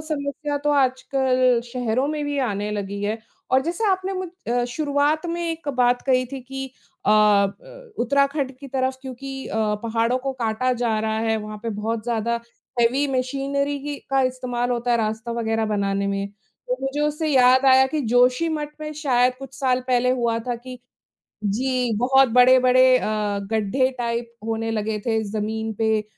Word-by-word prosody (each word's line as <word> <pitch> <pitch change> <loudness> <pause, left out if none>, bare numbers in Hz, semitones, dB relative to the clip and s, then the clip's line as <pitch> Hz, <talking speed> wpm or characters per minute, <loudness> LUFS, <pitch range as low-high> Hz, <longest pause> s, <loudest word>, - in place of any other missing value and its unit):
समस्या 290 -1 -3
तो 295 - +3
आजकल 255 -2 +2
शहरों 245 +1 -1
में 300 -1 -2
भी 290 0 -2
आने 210 -5 -1
लगी 200 -1 -4
है 215 +2 -1 0.3
और 260 +1 +5
जैसे 345 +8 -2
आपने 375 +1 -1
मुझ 370 -1 -4 0.2
अ, 245 0 +1
शुरुआत 290 +4 0
में 340 0 -3
एक 325 -2 -6
बात 245 0 +3
कही 255 -1 +2
थी 270 - -5
कि 270 +1 -6 0.4
अ - - +4
अ, 210 - +2
उत्तराखंड 280 +2 +1
की 275 -1 -10
तरफ़ 260 0 -1
क्योंकि 270 +1 -7
अ, - - -4 0.3
पहाड़ों 230 +2 +1
को 270 +1 -3
काटा 250 +1 0
जा 235 -3 0
रहा 220 0 -1
है, 225 0 +1
वहाँ 215 0 -6
पे 230 - -2
बहुत 220 +2 -3
ज़्यादा 235 0 -1 0.4
हेवी 260 +5 +3
मशीनरी 280 +2 -1
ही 290 - -3
का 270 0 +3
इस्तेमाल 250 -1 -1
होता 240 0 -1
है 235 - +4
रास्ता 220 +1 -2
वगैरह 225 0 0
बनाने 200 0 0
में। 200 0 -1 0.4
तो - - 0
मुझे 270 +2 -2
उससे 300 +1 0
याद 260 -1 +5
आया 265 0 +7
कि 305 +2 -2
जोशी 250 +6 +4
मठ 300 -2 -2
में 305 0 -5
शायद 250 -4 +2
कुछ 270 -1 -10
साल 255 -2 +1
पहले 250 0 +2
हुआ 235 -2 +1
था 245 - 0
कि 250 +1 -10 0.7
जी, 250 +3 0
बहुत 265 +2 +4
बड़े-बड़े 255 0 +6
अ, - - -3 0.5
गड्ढे 220 +4 +1
टाइप 235 0 -3
होने 225 0 -2
लगे 215 -1 -2
थे 225 -1 +1
जमीन 220 +1 -2
पे 220 -1 +2
255 Hz, 175 wpm, -23 LUFS, 225-275 Hz, 0.7 s, आया